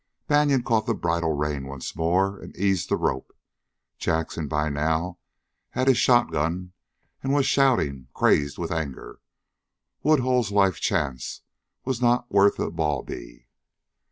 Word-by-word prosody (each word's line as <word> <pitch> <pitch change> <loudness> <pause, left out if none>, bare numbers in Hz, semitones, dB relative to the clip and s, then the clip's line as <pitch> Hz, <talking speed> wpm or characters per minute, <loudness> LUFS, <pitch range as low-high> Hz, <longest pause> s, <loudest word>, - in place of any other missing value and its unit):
Banion 145 -3 +3
caught 115 -3 +1
the 115 - +1
bridle 85 -3 0
rein 75 -2 -2
once 70 -1 -7
more 95 +4 +1
and - - -12
eased 95 -3 0
the - - +2
rope. 65 - -2 0.6
Jackson 80 -1 -1
by 75 +1 0
now 80 +4 -1 0.5
had 130 - -1
his 130 -3 +5
shotgun 90 -6 +2 0.5
and 135 - -1
was 140 -2 +3
shouting, 120 - +2
crazed 70 -1 +2
with 85 0 -4
anger. 75 -7 -5 0.8
Woodhull's 125 -7 +2
life 95 -6 +3
chance 65 -4 -2 0.4
was 130 -2 -2
not 120 0 +2
worth 100 0 +4
a - - -2
bawbee. 75 -6 -4
85 Hz, 130 wpm, -25 LUFS, 75-120 Hz, 0.8 s, his